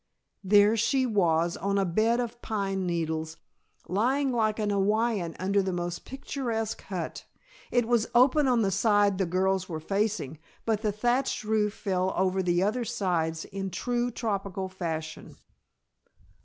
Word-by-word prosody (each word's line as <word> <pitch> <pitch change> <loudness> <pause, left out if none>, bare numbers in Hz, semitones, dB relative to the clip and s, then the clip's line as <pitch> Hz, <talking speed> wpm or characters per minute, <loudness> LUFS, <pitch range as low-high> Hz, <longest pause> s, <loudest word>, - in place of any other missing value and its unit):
There 205 +2 +5
she 260 +4 +2
was, 170 -7 +2
on 200 +2 -1
a 195 - +2
bed 220 +7 +2
of 240 0 -4
pine 195 -3 -2
needles, 160 -2 -2 0.5
lying 260 +8 +1
like 220 -3 +1
an 210 -2 0
Hawaiian 205 -3 +1
under 195 +2 +1
the 190 0 -2
most 175 -1 -4
picturesque 235 -5 -3
hut. 180 -4 -5 0.4
It 240 -2 +1
was 235 -2 +2
open 270 +4 +5
on 245 -3 +3
the 195 - +1
side 205 -1 +3
the 190 - +1
girls 185 +1 0
were 160 -2 -4
facing, 195 -4 -2 0.3
but 220 -2 0
the 215 -2 0
thatched 245 +4 0
roof 215 -1 0
fell 185 -2 -1
over 190 0 +1
the 175 0 +1
other 225 +5 0
sides 175 -8 -1
in 195 0 -5
true 245 +4 -1
tropical 200 -5 -3
fashion. 160 -4 -5
200 Hz, 150 wpm, -28 LUFS, 185-225 Hz, 0.5 s, There